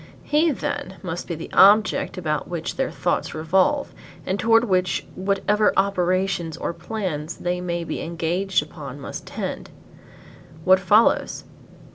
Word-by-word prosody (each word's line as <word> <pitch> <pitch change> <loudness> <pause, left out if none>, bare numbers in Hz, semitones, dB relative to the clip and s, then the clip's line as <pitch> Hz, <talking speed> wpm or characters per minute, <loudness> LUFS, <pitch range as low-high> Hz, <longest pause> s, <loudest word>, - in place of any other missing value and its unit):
He, 310 +3 +2
then, 190 -8 -3
must 175 -1 -5
be 170 - -3
the 165 - -8
object 205 +1 +5
about 155 -5 -2
which 170 -2 -4
their - - -1
thoughts - - -2
revolve 185 - +1 0.3
and 190 +2 -1
toward 225 +1 +4
which 185 -5 0
whatever 200 +2 +1
operations 185 -3 0
or 170 - -3
plans 175 -7 -4
they 180 0 -2
may 170 -1 -2
be - - -4
engaged 170 +2 0
upon 145 -3 -9
must 140 - -7
tend. - - -5 0.9
What 185 +2 +5
follows? 205 +4 +3
185 Hz, 135 wpm, -23 LUFS, 170-200 Hz, 0.9 s, object